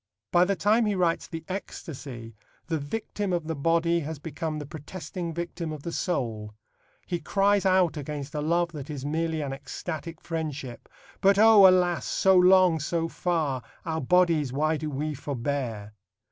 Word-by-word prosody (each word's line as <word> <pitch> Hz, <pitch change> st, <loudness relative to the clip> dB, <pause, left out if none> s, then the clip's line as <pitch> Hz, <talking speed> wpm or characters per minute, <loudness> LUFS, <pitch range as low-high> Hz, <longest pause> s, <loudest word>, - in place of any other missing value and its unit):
By 175 Hz, +1 st, +5 dB
the 200 Hz, +1 st, 0 dB
time 215 Hz, +5 st, +3 dB
he 205 Hz, -, +1 dB
writes 175 Hz, -3 st, +1 dB
The 165 Hz, -1 st, -7 dB
Ecstasy 135 Hz, -, -7 dB, 0.3 s
the 160 Hz, -2 st, -1 dB
victim 205 Hz, +5 st, -3 dB
of 170 Hz, -3 st, -1 dB
the 160 Hz, -, -2 dB
body 165 Hz, +3 st, +2 dB
has 160 Hz, 0 st, -5 dB
become 155 Hz, +1 st, -4 dB
the 150 Hz, -, -5 dB
protesting 165 Hz, +3 st, -6 dB
victim 170 Hz, 0 st, -4 dB
of 150 Hz, -2 st, -7 dB
the 170 Hz, -, -4 dB
soul. 110 Hz, -, -2 dB, 0.5 s
He 175 Hz, -2 st, -2 dB
cries 200 Hz, +3 st, +2 dB
out 185 Hz, -3 st, +3 dB
against 145 Hz, -1 st, -5 dB
a 150 Hz, -, -2 dB
love 170 Hz, +2 st, +1 dB
that 150 Hz, -2 st, -8 dB
is 140 Hz, -3 st, -5 dB
merely 160 Hz, +1 st, -1 dB
an 140 Hz, -2 st, -3 dB
ecstatic 160 Hz, +3 st, -6 dB
friendship: 150 Hz, -7 st, -5 dB, 0.3 s
But 195 Hz, 0 st, +5 dB
O 215 Hz, -2 st, +8 dB
alas, 180 Hz, -2 st, +3 dB
so 190 Hz, 0 st, +3 dB
long, 180 Hz, -2 st, +6 dB
so 165 Hz, +2 st, -1 dB
far, 160 Hz, -7 st, -1 dB, 0.2 s
Our 160 Hz, 0 st, -2 dB
bodies 165 Hz, -3 st, +3 dB
why 155 Hz, +4 st, +1 dB
do 155 Hz, 0 st, -4 dB
we 150 Hz, +2 st, -2 dB
forbear? 125 Hz, -6 st, -4 dB
160 Hz, 165 wpm, -27 LUFS, 145-180 Hz, 0.5 s, O